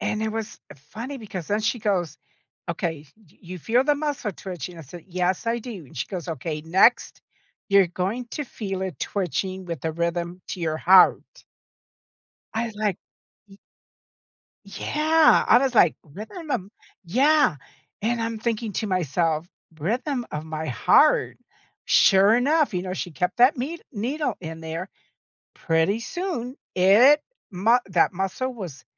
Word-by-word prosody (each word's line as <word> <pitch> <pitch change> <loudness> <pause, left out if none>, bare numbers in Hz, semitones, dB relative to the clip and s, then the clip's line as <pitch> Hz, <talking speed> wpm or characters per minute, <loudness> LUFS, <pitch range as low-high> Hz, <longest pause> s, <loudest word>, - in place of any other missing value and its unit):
And 215 0 -2
it 220 - -1
was 220 -1 -5 0.2
funny 225 - -8
because 195 - -7
then 210 +2 0
she 230 +3 0
goes, 180 -8 -1 0.5
"Okay, 160 -3 -3
y 210 -7 -25
you 180 0 -8
feel 245 - +2
the 295 0 +3
muscle 285 -8 -3
twitching?" 175 -2 -7
I 165 - -8
said, 165 +4 -12
"Yes, 185 +4 -1
I 235 +1 +1
do." 215 - -8
And - - -17
she - - -2
goes, 180 -3 -5
"Okay, 155 0 -4
next 190 +9 +3 0.5
you're 200 -2 +5
going 190 +8 -3
to 295 - -3
feel 195 -6 -5
it 190 -2 -5
twitching 190 0 -3
with 170 -5 -5
the 160 -1 -2
rhythm 170 +2 -3
to 180 - -5
your 160 -2 -1
heart." 185 +3 +6 1.3
I 225 +1 -1
was 225 -2 -8
like 210 -3 -1 0.5
Y 195 0 -17 1.1
Yeah, 315 +1 +3
I - - +7
was 260 -1 +1
like, 175 -7 +5
"Rhythm 220 - -9
of" 200 -6 -2 0.4
Yeah, 280 - +3 0.5
and 230 +2 0
I'm 225 -1 -2
thinking 225 -2 -2
to 215 - -2
myself, 170 -2 0 0.3
"Rhythm 245 - -2
of 150 +1 -4
my 160 0 -5
heart?" 125 - +3 0.5
Sure 200 +3 +5
enough, 285 0 +2
you 180 - -1
know, 185 0 -4
she 180 -2 -5
kept 180 +5 -2
that 255 +4 +5
ned 310 +7 -4
needle 265 +7 -2
in 160 -1 -7
there. 165 +4 -6 0.7
Pretty 165 +6 +1
soon, 290 -4 -4 0.2
it 230 +11 +6 0.3
mu 210 +6 +3
that 180 -2 +2
muscle 195 +8 -3
was 175 - -8
195 Hz, 155 wpm, -24 LUFS, 170-240 Hz, 1.3 s, I